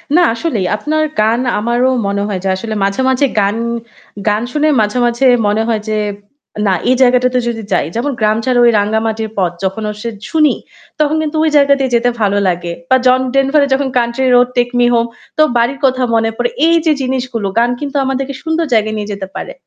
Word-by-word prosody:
না 355 - +5
আসলেই 230 - -2
আপনার 310 +6 -1 0.2
গান 225 +3 +2 0.2
আমারও 240 +4 +1 0.2
মনে 200 0 -1
হয় 195 -3 -3
যে 195 - -1
আসলে 220 +3 -5
মাঝে, 195 +5 0
মাঝে 260 +2 +2 0.2
গান, 200 +1 +1 0.7
গান 210 +1 0
শুনে 300 +3 +1
মাঝে, 210 +3 -1
মাঝে 240 +2 0 0.2
মনে 210 +2 +1
হয় 220 -2 0
যে 215 - 0 0.7
না 195 - +3 0.2
এই 255 - +4
জায়গাটাতে 250 0 +3
যদি 230 -1 -3
যাই, - - +1
যেমন 255 +5 -1
'গ্রাম 215 0 +2
ছাড়ার 250 -1 +2
ওই 240 - +6
রাঙ্গা 210 +2 0
মাটির 220 0 -3
পথ' 180 -3 0
যখন 190 +3 -2
আসলে 210 +2 -5 0.2
শুনি, 305 -3 +3 0.4
তখন 305 0 +2
কিন্তু 310 0 -3
ওই 320 - +3
জায়গাতেই 280 -1 +4
দিয়ে 260 -2 -1
যেতে 235 +1 +2
ভালো 205 -1 +2
লাগে। 175 -1 -2 0.2
বা 260 - +5
জন 255 0 +5 0.2
ডেনভারের 275 +1 +3
যখন 270 +1 0
'country 240 +2 0
road 245 0 +5
take 245 0 +1
me 245 - +4
home' 235 0 +1 0.3
তো - - +4 0.2
বাড়ির 240 +4 0
কথা 260 -1 +1
মনে 225 0 +2
পড়ে। - - 0 0.2
এই 335 - +4
যে 320 - +4
জিনিসগুলো 255 -4 -2
গান 240 +1 +2
কিন্তু 290 0 -5
আমাদেরকে 270 +1 -2
সুন্দর 325 0 -1
জায়গায় 220 0 +1
নিয়ে 210 0 -4
যেতে 195 -1 -6
পারে। - - -6
240 Hz, 205 wpm, -14 LUFS, 215-270 Hz, 0.7 s, ওই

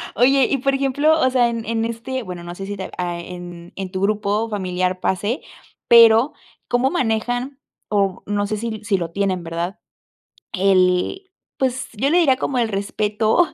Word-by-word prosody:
Oye, 260 +3 +4
y 275 - +1
por 275 +1 0
ejemplo, 285 +4 +2
o 260 - +3
sea, 245 -2 +3
en 230 -1 -4
en 225 0 -1
este, 235 +3 -4
bueno, 180 -3 -7
no 175 0 -7
sé 195 - -6
si 205 +1 -5
te 190 - -5
a 175 -1 -2
en 175 0 -9
en 190 -1 -5
tu 185 -1 -3
grupo 210 +2 0
familiar 185 -2 -1
pase, 205 - -1 0.5
pero, 230 +4 +7 0.3
¿cómo 245 +2 +2
manejan?, 245 -1 -1 0.3
o 195 -3 0
no 205 0 -1
sé, 215 +1 -2
si 220 -1 -5
si 205 -2 +1
lo 170 -2 -4
tienen, 190 -2 -1
¿verdad?, 170 +4 -4 0.7
el, 190 - +2 0.3
pues, 260 -1 -1
yo 260 +6 0
le 335 - +3
diría 270 -7 +4
como 265 0 -2
el 235 - +2
respeto 210 - +1
215 Hz, 175 wpm, -21 LUFS, 185-255 Hz, 0.7 s, pero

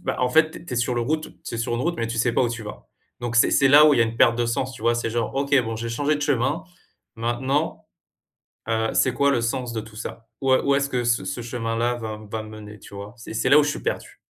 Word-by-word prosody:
bah, - - -2
en 125 - +2
fait, 155 +4 +4
tu - - -9
es - - -16
tu 170 - -8
es - - -3
sur 125 +1 0
le 120 - 0
route 155 +6 -2
tu - - -5
es - - -3
sur 115 +1 -1
une 120 - -2
route, 170 +5 -1
mais 115 - -1
tu 115 0 -4
sais 120 +1 +2
pas - - +2
où 120 - +2
tu 115 -1 -5
vas. 105 - -10 0.3
Donc, 120 -1 -2
c'est 120 - +5
c'est 140 -1 +4
là 150 +3 +8
où 150 - +6
il - - +1
y - - +4
a - - +6
une 115 0 -4
perte 115 0 +5
de 120 - +1
sens, 130 +3 -1
tu - - -12
vois? 120 - +3
C'est 120 -1 -2
genre: 115 -1 -2
«OK 140 +1 -2
bon 115 -1 -4
j'ai 115 +1 -4
changé 145 +6 0
de - - -7
chemin 145 +1 0 0.5
maintenant, 130 +6 -1 0.8
heu, 110 0 +1
c'est 130 - +3
quoi 140 +2 +3
le 135 - +2
sens 120 +1 -2
de 115 - -3
tout 110 0 -12
ça? 115 +1 -7
où 135 -1 +3
est - - +3
où 140 - +2
est-ce 140 0 0
que 125 -3 -1
ce 120 0 +1
ce 140 -4 -4
chemin-là 115 0 -1
va 110 -2 -6
va 110 0 -3
me 110 - -10
mener?» 105 -1 -10
tu - - -13
vois? 100 +2 -8
C'est 115 - -9
et - - -9
c'est 115 - 0
là 145 - +8
où 150 - +6
je 145 - 0
suis - - -5
perdu. - - -4
120 Hz, 315 wpm, -23 LUFS, 115-135 Hz, 0.8 s, là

